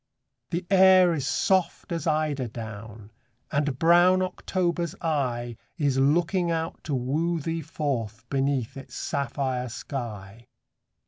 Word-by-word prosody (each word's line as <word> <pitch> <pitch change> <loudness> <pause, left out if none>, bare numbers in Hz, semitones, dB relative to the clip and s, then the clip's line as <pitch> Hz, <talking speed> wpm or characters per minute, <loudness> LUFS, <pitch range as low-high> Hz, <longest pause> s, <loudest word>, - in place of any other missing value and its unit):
The 175 +1 -2
air 185 -2 +7
is 145 -4 -2
soft 180 +8 +1
as 165 -1 -2
eider 150 -4 0
down; 110 -1 -9 0.4
And 145 -2 0
brown 175 +4 +5
October's 175 -2 -2
eye 120 -7 -1 0.2
Is 140 -5 +1
looking 170 +5 +2
out 165 0 -3
to 145 - -1
woo 155 +7 0
thee 165 +2 -3
forth 120 -7 -3
Beneath 135 -3 -1
its 135 - -10
sapphire 130 -3 -2
sky. 115 -4 -7
145 Hz, 120 wpm, -26 LUFS, 125-170 Hz, 0.4 s, air